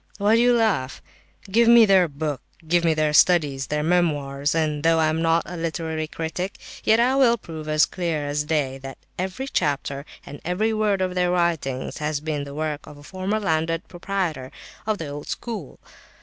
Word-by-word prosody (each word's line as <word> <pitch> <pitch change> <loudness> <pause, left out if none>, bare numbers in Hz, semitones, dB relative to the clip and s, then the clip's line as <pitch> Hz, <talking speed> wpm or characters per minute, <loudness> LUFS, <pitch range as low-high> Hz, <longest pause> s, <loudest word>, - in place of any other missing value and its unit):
Why 210 +2 +3
do 230 - +4
you 245 0 +4
laugh? 200 - 0 0.4
Give 225 +4 +2
me 235 -1 +8
their 190 -3 +5
books, 145 -2 -4 0.3
give 175 +1 +3
me 165 -2 +3
their 155 -1 +1
studies, 150 -6 +3
their 150 0 -1
memoirs, 145 -4 +1
and 155 -2 0
though 165 +1 +3
I 160 -1 +3
am 160 +1 -1
not 165 0 +2
a 180 - -7
literary 160 -1 -3
critic, 165 +5 -4 0.3
yet 220 +1 +4
I 250 +3 +3
will 245 -4 +4
prove 160 -6 -8
as 155 0 +4
clear 165 -5 -3
as 145 +1 -1
day 145 -4 -1
that 135 0 -9 0.2
every 190 +8 -3
chapter 140 - -1 0.2
and 145 - -10
every 210 +6 0
word 210 -3 +1
of 185 -1 0
their 180 -1 +1
writings 170 -7 -1
has 150 -1 -1
been 150 -1 -3
the 140 0 -9
work 155 -1 -3
of 150 - -11
a 145 - -14
former 190 +6 -2
landed 165 -3 -1
proprietor 175 -7 -3 0.4
of 215 -1 +1
the 160 - -5
old 145 +1 -7
school. 215 - -6
165 Hz, 190 wpm, -23 LUFS, 150-190 Hz, 0.4 s, me